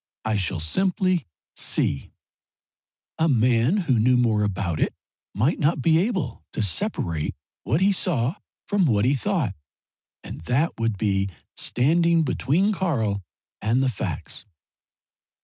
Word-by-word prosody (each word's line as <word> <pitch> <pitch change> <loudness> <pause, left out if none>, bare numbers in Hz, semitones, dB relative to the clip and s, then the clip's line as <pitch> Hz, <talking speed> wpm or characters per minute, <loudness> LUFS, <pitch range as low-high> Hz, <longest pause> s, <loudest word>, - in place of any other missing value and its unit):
I 110 -1 +1
shall 95 -3 -1
simply 185 - 0 0.3
see. 70 - 0 1.1
A 160 - +3
man 120 - +3
who 130 -7 +2
knew 125 +3 +4
more 115 -4 +2
about 95 -5 -1
it - - 0 0.4
might 125 - +1
not 150 +1 +2
be 160 +4 +4
able 195 -3 -1
to - - -1
separate 90 - -1 0.3
what 150 +9 +1
he 200 +1 +5
saw 150 -8 +1 0.3
from 200 -3 +2
what 105 -4 +2
he 130 - +3
thought 145 - 0 0.7
and - - -8
that 140 - +1
would 115 -3 0
be 100 -1 0 0.3
standing 165 +6 +2
between 160 +9 +1
Karl 115 - -1 0.4
and 120 +5 +2
the 135 - +2
facts." 105 - -4
130 Hz, 130 wpm, -24 LUFS, 105-170 Hz, 1.1 s, he